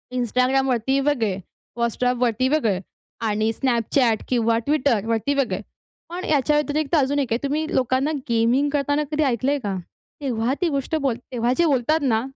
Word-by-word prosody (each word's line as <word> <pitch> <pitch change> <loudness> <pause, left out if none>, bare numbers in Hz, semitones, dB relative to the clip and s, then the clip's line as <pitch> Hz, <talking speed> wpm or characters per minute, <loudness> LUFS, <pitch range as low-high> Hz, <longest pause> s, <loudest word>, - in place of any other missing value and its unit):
Instagramवरती 255 +1 +1
वेगळे, 245 -9 0 0.4
WhatsAppवरती 245 +1 +1
वेगळे 230 -11 +1 0.5
आणि 215 +1 +1
Snapchat 235 -2 +1
किंवा 230 -2 +2
Twitterवरती 235 -3 +1
वेगळे. 275 -2 0 0.5
पण 355 +2 -5
याच्या 295 0 +2
व्यतिरिक्त 300 +1 0
अजून 285 -1 +2
एक 255 -5 0
आहे 235 - -2
तुम्ही 295 +3 0
लोकांना 260 +3 +1 0.2
गेमिंग 235 +5 +2
करताना 290 +1 +1
कधी 305 0 +1
ऐकलंय 270 +2 +1
का? 200 -2 -2 0.5
तेव्हा 245 -2 0
ती 355 - +3
गोष्ट 280 +1 -2
बोल 265 -4 +1 0.2
तेव्हा 240 -1 0
जे 345 - +4
बोलतात 295 +1 +2
ना, 230 -6 +2
260 Hz, 145 wpm, -23 LUFS, 230-285 Hz, 0.5 s, जे